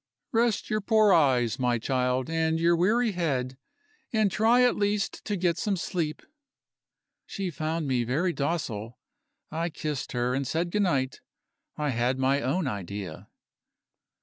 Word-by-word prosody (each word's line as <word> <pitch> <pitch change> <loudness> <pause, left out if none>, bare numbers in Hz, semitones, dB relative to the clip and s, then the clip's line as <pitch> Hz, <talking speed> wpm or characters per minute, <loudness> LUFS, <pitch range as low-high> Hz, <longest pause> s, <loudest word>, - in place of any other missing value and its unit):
"Rest 230 -2 +1
your 215 0 +1
poor 215 -1 +4
eyes, 130 -8 +3
my 125 -1 +2
child, 125 +2 0
and 160 0 0
your 170 +1 +4
weary 215 +7 +2
head 135 -8 -1 0.6
and 215 -4 +2
try 230 +5 +4
at 245 - +4
least 205 0 -1
to 210 - -1
get 175 -2 0
some 200 -3 0
sleep." 165 -3 -3 1.0
She 195 -3 -4
found 155 +1 -2
me 125 -3 +1
very 155 +10 0
docile; 125 -8 -3 0.5
I 165 +2 -1
kissed 150 -3 -4
her, 125 0 0
and 135 0 -1
said 170 +5 -1
good 210 - +1
night. 135 -9 0 0.6
I 150 -1 -1
had 125 +1 0
my 135 +2 +2
own 165 +7 0
idea. 100 -6 -5
160 Hz, 150 wpm, -27 LUFS, 130-185 Hz, 1.0 s, poor